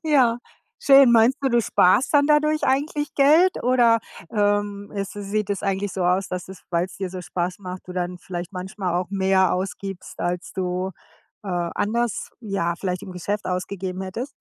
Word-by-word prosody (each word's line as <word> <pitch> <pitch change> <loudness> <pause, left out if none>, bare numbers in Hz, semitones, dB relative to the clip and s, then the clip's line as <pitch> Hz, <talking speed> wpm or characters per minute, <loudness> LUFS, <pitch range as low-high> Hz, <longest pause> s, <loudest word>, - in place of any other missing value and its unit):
Ja, 255 -6 +3 0.4
schön. 275 -3 +7
Meinst 230 +3 +5
du, 270 - +1
du 240 0 +4
sparst 225 +7 +3
dann 285 0 +5
dadurch 305 0 +3
eigentlich 290 +2 0
Geld? 315 +7 +4
Oder, 240 -2 +4 0.3
ähm, 205 -1 0
es 195 -1 -3
sieht 205 0 -3
es 200 - -2
eigentlich 195 -1 -1
so 190 - -2
aus, 180 +2 +1
dass 180 0 -5
es, 190 - -11
weil's 175 +2 -1
dir 190 -2 -4
so 185 -1 -6
Spaß 180 +1 -3
macht, 185 -2 -7
du 180 - -7
dann 180 0 -3
vielleicht 175 +1 -7
manchmal 185 0 -3
auch 180 +2 -1
mehr 190 -1 +2
ausgibst, 190 0 -5
als 175 +1 -3
du, 185 0 -2 0.5
äh, 200 - -8 0.3
anders, 225 +2 -1
ja, 195 -6 -1
vielleicht 185 0 -3
im 185 - -8
Geschäft 200 +4 -3
ausgegeben 185 0 -3
hättest? 230 +9 -5
195 Hz, 175 wpm, -23 LUFS, 185-235 Hz, 0.5 s, schön